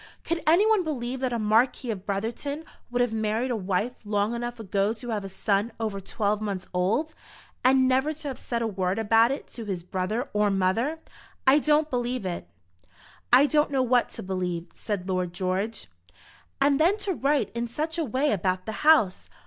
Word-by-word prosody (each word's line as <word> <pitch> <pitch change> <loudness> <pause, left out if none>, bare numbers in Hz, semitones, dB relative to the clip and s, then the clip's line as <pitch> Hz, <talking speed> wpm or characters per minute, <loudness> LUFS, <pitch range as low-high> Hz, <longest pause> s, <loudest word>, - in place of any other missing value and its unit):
Could 335 0 -2
anyone 400 +5 +5
believe 260 -5 -3
that 260 -1 -1
a 235 - 0
Marquis 230 +3 +2
of 195 -3 -7
Brotherton 235 +10 -3 0.2
would 245 0 +2
have 240 -2 -2
married 220 +3 0
a - - +1
wife 200 +4 -1
long 205 +1 0
enough 240 0 -4
ago 200 0 0
to 240 +2 -9
have 210 -2 -2
a 195 - -6
son 200 +3 0
over 215 -3 -2
twelve 205 +2 -1
months 195 -3 -3
old, 220 - 0 0.5
and 260 0 +5
never 265 +4 +2
to 305 -1 -6
have 265 - -6
said 235 -1 -2
a - - 0
word 190 -2 -1
about 225 +1 +4
it 275 - -3
to 230 - -7
his 185 -4 -4
brother 190 +8 -2
or 210 0 +3
mother? 195 +10 +1 0.5
I 275 +2 +6
don't 300 +1 +2
believe 245 -3 -1
it." 175 - -4 0.8
"I 255 +4 +8
don't 300 0 +2
know 270 -2 +1
what 245 -1 +2
to - - -7
believe," 180 -2 -3
said 200 -4 -4
Lord 180 -2 -1
George. 190 +4 -2 0.7
"And 275 0 +3
then 355 +6 +4
to 390 - 0
write 285 -2 +1
in 235 0 -2
such 315 +8 -3
a - - +1
way 270 +3 +1
about 185 -1 0
the 220 - -3
house! 300 -12 +4
230 Hz, 190 wpm, -26 LUFS, 200-270 Hz, 0.8 s, I